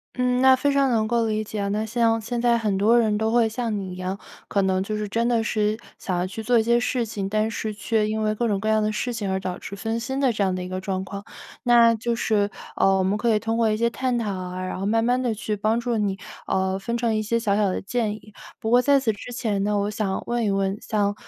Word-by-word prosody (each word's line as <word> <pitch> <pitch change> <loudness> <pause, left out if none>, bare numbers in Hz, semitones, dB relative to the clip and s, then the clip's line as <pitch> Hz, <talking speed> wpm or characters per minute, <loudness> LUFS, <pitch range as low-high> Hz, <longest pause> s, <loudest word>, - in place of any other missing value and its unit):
嗯， 250 0 +1
那 265 0 +7
非 285 +2 +1
常 275 -1 +3
能 220 -3 +1
够 235 0 +1
理 215 0 -1
解 215 0 -6
啊， 200 - -1
那 210 +2 -1
像 225 0 +2
现 235 +2 -3
在 240 -1 +3
很 215 -4 0
多 215 +5 +4
人 215 -3 +2
都 220 0 +1
会 235 -1 +4
像 225 0 -2
你 190 -2 -5
一 - - -7
样， 185 +1 -3 0.3
可 200 - +1
能 190 -1 +1
就 215 +2 -3
是 210 0 -3
真 230 +3 0
的 235 -2 +2
是 215 -1 0 0.2
想 185 -2 -2
要 175 - 0
去 195 +4 -6
做 240 +2 +3
一 225 - +3
些 235 +1 +3
事 245 0 0
情， 200 -3 -4
但 215 +2 0
是 220 -1 -3
却 215 0 0
因 220 0 -1
为 215 0 +1
各 235 +2 -1
种 205 -3 0
各 215 - -3
样 220 0 +3
的 215 0 +1
事 240 +3 -2
情 210 -4 -3
而 190 0 0
导 185 -1 -4
致 200 - -7
分 225 +3 -2
心 265 +3 -3
的 265 -4 +2
这 210 - 0
样 190 -1 +1
的 180 - -4
一 - - -6
个 185 0 -4
状 190 0 -3
况。 200 +1 -7 0.4
那 235 -1 +6
就 235 +1 -1
是， 210 -3 +1 0.3
呃， 195 0 +4
我 190 - +1
们 190 +2 +1
可 235 +3 0
以 - - +4
通 225 +1 -1
过 230 -1 +3
一 215 - +1
些 235 +1 +2
探 255 -1 -1
讨 220 -3 -1
啊， 185 0 -5
然 185 - -4
后 195 - -2
慢 225 +2 +2
慢 245 +2 +2
地 245 -3 0
去 210 0 -3
帮 215 +3 +1
助 240 -1 -1
你， 200 -2 0 0.3
呃， 190 0 0
分 235 +4 -2
成 235 -1 0
一 215 - +1
些 220 +2 0
小 210 -3 +1
小 210 -1 +2
的 185 - -2
建 220 0 -1
议。 215 -1 -15 0.3
不 220 - -2
过 245 +1 +6
在 280 +2 +4
此 240 -4 +1
之 210 - -9
前 220 -5 -1
呢， 205 0 +1
我 200 +1 0
想 205 -2 -2
问 240 0 -1
一 210 - +1
问， 195 0 0
像， 205 -2 0
215 Hz, 305 characters per minute, -24 LUFS, 200-235 Hz, 0.4 s, 那